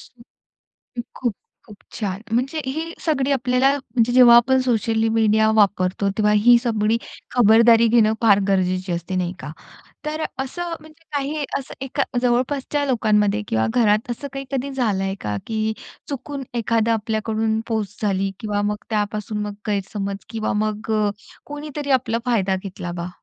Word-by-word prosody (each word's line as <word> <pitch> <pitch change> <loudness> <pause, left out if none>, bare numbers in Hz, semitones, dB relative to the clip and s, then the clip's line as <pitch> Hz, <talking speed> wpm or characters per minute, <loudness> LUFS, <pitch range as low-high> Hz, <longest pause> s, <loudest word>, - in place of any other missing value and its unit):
हं, 245 - -17 0.8
हं. 240 - -2
खूप, 240 -4 -1 0.3
खूप 210 - -13 0.2
छान! 200 -3 -3
म्हणजे 270 +7 0
हे 280 +5 -2 0.2
सगळी 285 -4 +1
आपल्याला, 255 0 +2
म्हणजे 240 -3 0
जेव्हा 245 -2 +8
आपण 260 +2 +4
सोशल 225 -2 +1
मीडिया 220 -1 +3
वापरतो. 200 -2 +2
तेव्हा 210 -1 +3
ही 240 +3 +6
सगळी 220 -1 +1 0.3
खबरदारी 230 0 +6
घेणं 220 -1 +4
फार 205 -3 +5
गरजेचे 185 -1 0
असते 170 +2 -4
नाही 180 -1 -1
का? 150 - -7 0.6
तर 310 +1 -2 0.2
असं 345 +5 -5
म्हणजे 315 +1 -18
काही 290 +2 -2
असं 270 - -9
एका 270 +1 -1 0.2
जवळपासच्या 260 +4 0
लोकांमध्ये 215 -4 +2
किंवा 110 0 +1
घरात 220 -1 +2
असं 280 +4 -5
काही 275 0 -5
कधी 270 +1 -2
झालं 230 -8 0
आहे 195 0 -2
का? 105 0 -3
की 220 -1 -1 0.4
चुकून 280 0 -5
एखादा 230 -1 +1
आपल्याकडून 220 0 -1
पोस्ट 215 -3 -3
झाली 195 -1 0
किंवा 205 -2 -1
मग 210 0 0
त्यापासून 210 0 -2
मग 205 0 -4
गैरसमज 200 0 -3
किंवा 225 -2 -2
मग 215 +1 -4
अ, 210 -1 +2 0.4
कोणीतरी 290 -1 -6
आपला 230 -2 -2
फायदा 195 -6 +1
घेतला 180 -2 -6
बा? 170 0 -5
225 Hz, 155 wpm, -22 LUFS, 205-255 Hz, 0.8 s, जेव्हा